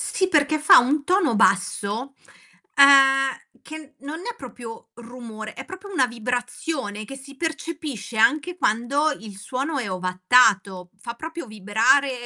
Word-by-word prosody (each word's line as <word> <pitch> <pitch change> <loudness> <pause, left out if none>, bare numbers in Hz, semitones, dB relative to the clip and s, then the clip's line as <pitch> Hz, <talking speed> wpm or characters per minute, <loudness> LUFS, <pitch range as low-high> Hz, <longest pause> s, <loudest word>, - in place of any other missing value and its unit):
Sì 375 - -1
perché 305 -2 +1
fa 305 - +7
un 285 +4 0
tono 360 - +2
basso, 210 +5 0 0.6
ehm, 270 -1 +5 0.2
che 310 -2 -11
non 295 +4 -7
è 475 +5 -6
proprio 230 - -11
rumore, 230 -2 -10
è 265 - -9
proprio 385 +2 -10
una 270 -9 +2
vibrazione 245 -1 -4
che 270 - -9
si 275 +1 -13
percepisce 310 -9 -5
anche 310 +10 +2
quando 275 +5 0
il 210 -3 -11
suono 270 +7 -4
è 230 - -4
ovattato, 185 0 +2
fa 235 +3 -7
proprio 320 0 -8
vibrare 220 +7 +2
265 Hz, 135 wpm, -22 LUFS, 220-300 Hz, 0.6 s, fa